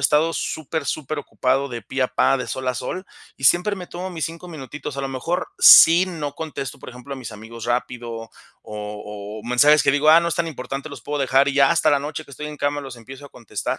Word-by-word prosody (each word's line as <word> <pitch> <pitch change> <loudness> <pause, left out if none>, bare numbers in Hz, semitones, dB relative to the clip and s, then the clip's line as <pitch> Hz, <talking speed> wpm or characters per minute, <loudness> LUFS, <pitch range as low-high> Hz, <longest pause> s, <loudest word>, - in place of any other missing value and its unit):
estado 155 +3 +3
súper, 160 0 -3
superocupado 140 -2 -1
de 120 -2 -6
pe 130 +6 -3
a 125 - +1
pa, 135 - +2
de 125 -3 -5
sol 130 0 -4
a 125 - 0
sol, 175 +10 -5 0.3
y 135 - -7
siempre 180 +8 +4
me 180 -2 -8
tomo 185 +2 -6
mis 165 -3 -3
5 170 +2 -7
minutitos. 150 -2 -7
A - - -2
lo 135 - -2
mejor, 135 +7 -2
sí, 170 +3 +9
no 155 -5 -5
contesto, 145 -4 -6
por - - -10
ejemplo, 125 +3 -8
a - - -9
mis 125 -4 -7
amigos 110 +2 -9
rápido, 120 -1 -2
o 115 -1 -7 0.3
o 105 0 -7
mensajes 145 +5 +5
que 135 - +4
digo: 145 +2 +2
"Ah, 165 - +8
no 170 - 0
es 170 - 0
tan 165 -1 -1
importante, 135 0 -6
los 145 - -10
puedo 145 -1 -3
dejar", 135 +1 +3
y 140 - 0
ya 140 +2 +5
hasta 170 -2 +3
la 145 -2 +3
noche, 150 +2 -5
que 140 - -16
estoy 150 +3 -6
en 150 0 -8
cama, 145 0 -1
los 135 -3 -9
empiezo 135 +5 -11
a - - -14
contestar. 115 -5 -5
140 Hz, 245 wpm, -22 LUFS, 125-155 Hz, 0.3 s, sí